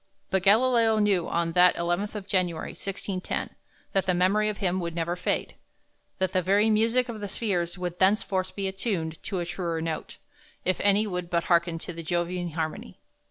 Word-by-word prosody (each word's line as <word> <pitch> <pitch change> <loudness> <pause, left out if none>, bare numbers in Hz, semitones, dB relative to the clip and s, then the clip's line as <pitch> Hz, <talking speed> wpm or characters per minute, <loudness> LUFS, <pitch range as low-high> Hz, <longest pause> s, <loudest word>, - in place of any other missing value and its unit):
But 190 - +2
Galileo 225 +2 +4
knew 200 -5 +2
on 170 0 0
that 180 +1 +5
11th 175 +5 -1
of 205 -2 -5
January, 180 -4 -1
1610, 195 -1 -4 0.4
that 190 -1 +1
the 185 - +3
memory 200 +4 +3
of 210 - -4
him 185 -2 0
would 170 -2 -4
never 170 +1 -1
fade; 180 - -1 0.6
that 190 -1 -1
the 185 - +3
very 200 +5 +3
music 230 +4 +3
of 230 -3 -6
the 205 - -3
spheres 180 -4 -2
would 180 -1 -4
thenceforward 190 -1 +2
be 195 -1 -2
attuned 190 -5 -3
to 195 - -4
a 175 - -1
truer 170 -1 -3
note, 160 -1 -4 0.5
if 185 - +1
any 205 +1 +3
would 180 -4 -4
but 170 -1 +1
hearken 170 -1 +2
to 175 +2 -6
the 165 - -6
Jovian 175 +1 -2
harmony. 160 -1 -4
185 Hz, 185 wpm, -27 LUFS, 170-205 Hz, 0.6 s, that